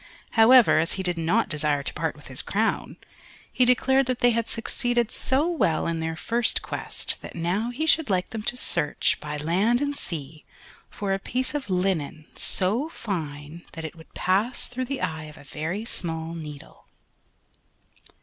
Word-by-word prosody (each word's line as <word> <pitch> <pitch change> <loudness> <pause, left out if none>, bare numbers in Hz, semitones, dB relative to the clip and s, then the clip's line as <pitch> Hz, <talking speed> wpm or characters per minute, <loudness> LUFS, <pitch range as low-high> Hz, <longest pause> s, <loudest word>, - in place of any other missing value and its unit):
However 235 -3 +7
as 165 +2 +1
he 190 - -2
did 180 -1 +1
not 175 +8 +2
desire 150 -2 0
to - - -2
part - - -2
with - - -15
his - - -1
crown, - - -1 0.6
he 255 - +4
declared 265 +2 +4
that 255 -1 0
they 245 0 +4
had 230 -1 0
succeeded 240 0 +1
so 275 +5 +1
well 315 - +1
in 165 -1 -1
their 160 0 -2
first 230 +7 0
quest - - -3
that - - -9
now 180 +7 0
he 270 +6 -2
should 320 -4 +3
like 185 -2 0
them 225 - -4
to 240 +3 0
search, 150 - +1
by 150 0 -4
land 190 +11 +2
and 285 0 -1
sea, 155 - -6 0.5
for 200 -2 -2
a 195 - 0
piece 255 +7 -2
of 285 -6 -3
linen 180 -5 0
so 220 - 0
fine 160 - -5
that 160 -1 -6
it 160 - -6
would 160 -1 -15
pass 205 +7 +1
through 255 +1 -3
the 275 +1 -4
eye 160 -1 -2
of 150 -1 -12
a - - -13
very 160 +9 -4
small 165 -6 -4
needle. 150 -4 -9
190 Hz, 180 wpm, -26 LUFS, 160-245 Hz, 0.6 s, However